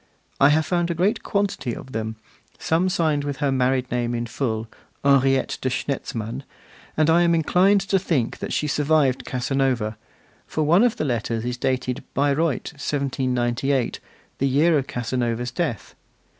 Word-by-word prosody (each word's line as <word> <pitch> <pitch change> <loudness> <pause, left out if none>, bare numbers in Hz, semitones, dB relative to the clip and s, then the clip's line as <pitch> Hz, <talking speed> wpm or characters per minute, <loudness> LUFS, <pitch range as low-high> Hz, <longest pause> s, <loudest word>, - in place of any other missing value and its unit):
I 140 - +6
have 155 +1 +3
found 175 -1 0
a 170 - -1
great 200 +8 +1
quantity 200 - -1
of 130 - -10
them, 110 -1 -3 0.4
some 170 +3 +1
signed 155 -5 +1
with 145 -1 -3
her 145 -2 0
married 130 -1 +1
name 120 -1 -1
in 120 0 -2
full, 115 -2 -3 0.4
'Henriette 135 -1 +3
de 130 - 0
Schnetzmann,' 120 -3 -3 0.6
and 155 -1 +3
I 165 +1 +5
am 170 -1 +4
inclined 185 +5 +3
to 195 0 +1
think 150 -10 -1
that - - -5
she - - 0
survived 150 -2 +2
Casanova, 130 -4 -1 0.5
for 155 - -1
one 170 +6 +4
of 245 -1 +3
the - - -1
letters 115 -3 -2
is 125 0 -2
dated 130 +1 -1
Bayreuth, 145 +1 0
1798, 130 -2 -1 0.4
the 135 - +2
year 155 +5 +3
of 135 -2 0
Casanova's 120 -2 -2
death. 140 - -3
135 Hz, 155 wpm, -23 LUFS, 125-160 Hz, 0.6 s, I